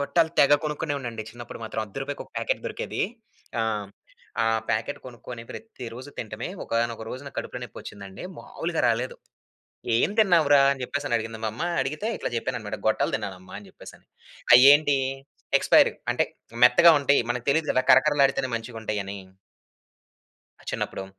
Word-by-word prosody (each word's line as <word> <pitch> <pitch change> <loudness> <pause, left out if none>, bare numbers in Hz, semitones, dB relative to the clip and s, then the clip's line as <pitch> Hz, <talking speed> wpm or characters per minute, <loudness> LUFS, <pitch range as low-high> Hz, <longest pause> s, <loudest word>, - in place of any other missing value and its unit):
గొట్టాలు 160 +3 +2
తెగ 145 +1 +6
కొనుకునే 150 0 -2
ఉన్నా 125 -3 -5
అండి 110 -1 -6
చిన్నపుడు 120 0 -9
మాత్రం. 110 0 -4
అర్ధ 105 - -17
రూపాయికొక 145 +1 -6
ప్యాకెట్ - - -1
దొరికేది. - - -4 0.6
ఆ! - - +2 0.8
ఆ - - +1 0.2
ప్యాకెట్ 115 +5 -1
కొనుకొని 120 -1 -9
ప్రతిరోజు 130 - -9
తినటమే. 110 +1 -5 0.2
ఒకానొక 115 -1 -1
రోజు 130 +2 -6
నాకు - - -10
కడుపులో - - -5
నొప్పి - - -9
వచ్చిందండి. 100 - -9
మాములుగా 165 -1 -4
రాలేదు. 120 +3 -1 0.8
"ఎం 120 - +2
తిన్నావురా?" 165 -9 +5
అని 135 -2 -6
చెప్పేసినడిగింది 115 -5 -2
మా 110 - 0
అమ్మ. 120 - -6 0.2
అడిగితే 155 +11 -3
ఇట్లా - - -4
చెప్పానన్నమాట 115 -3 -3
గొట్టలు 110 - +1
తిన్నానమ్మ 95 -4 -8
అని 105 - -13
చెప్పేసని. - - -14 0.5
అయేంటి 145 +2 +7 0.6
ఎక్స్‌పైర్డ్ - - +4 0.2
అంటే - - +1 0.4
మెత్తగా 170 +7 +8
ఉంటాయి. 140 -1 +3
మనకు 120 -1 -3
తెలీదు 155 +2 +1
కదా! 130 - +2
కరకరలాడితేనే 135 -1 +4
మంచిగుంటాయని... 110 -4 -5 1.5
చిన్నప్పుడు. 95 - -3
125 Hz, 140 wpm, -25 LUFS, 110-145 Hz, 1.5 s, మెత్తగా